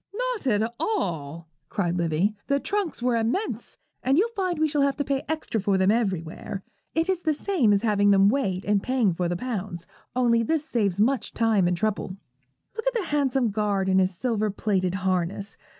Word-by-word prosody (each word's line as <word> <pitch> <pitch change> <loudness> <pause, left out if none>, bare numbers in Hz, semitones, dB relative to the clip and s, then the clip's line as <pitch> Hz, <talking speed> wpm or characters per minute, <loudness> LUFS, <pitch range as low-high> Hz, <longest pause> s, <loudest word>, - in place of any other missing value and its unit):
'Not - - -2
at 220 0 +1
all,' 170 - -2 0.2
cried 175 -4 -1
Livy; 170 +4 +1
'the 280 0 +2
trunks 400 -11 -2
were 250 -1 +2
immense, 230 - -2 0.2
and 270 +2 +2
you'll 430 +7 +3
find 370 -4 -1
we 315 0 +2
shall 295 -1 0
have 275 0 +2
to 285 - 0
pay 275 -1 -1
extra 310 -9 -1
for 195 0 +2
them 190 +1 +4
everywhere. 195 -2 -2 0.3
It 325 +1 +1
is 375 -2 0
the 310 -3 +1
same 300 - +2
as 200 +1 +2
having 205 -2 +3
them 195 0 +6
weighed 200 -6 0
and 205 -1 +2
paying 250 -6 +1
for 175 +1 -1
the 175 - -1
pounds, 200 -6 -4 0.3
only 235 -2 +3
this 305 +6 0
saves 205 - 0
much 255 +5 +1
time 220 -5 +3
and 175 0 0
trouble. 200 -1 -2 0.6
Look 450 +2 -4
at - - +1
the 405 -8 -2
handsome 270 -5 +1
guard 200 -2 0
in 190 0 +4
his 185 -1 +1
silver 220 -3 0
plated 190 -3 0
harness. 185 +2 -1
220 Hz, 195 wpm, -25 LUFS, 190-280 Hz, 0.6 s, them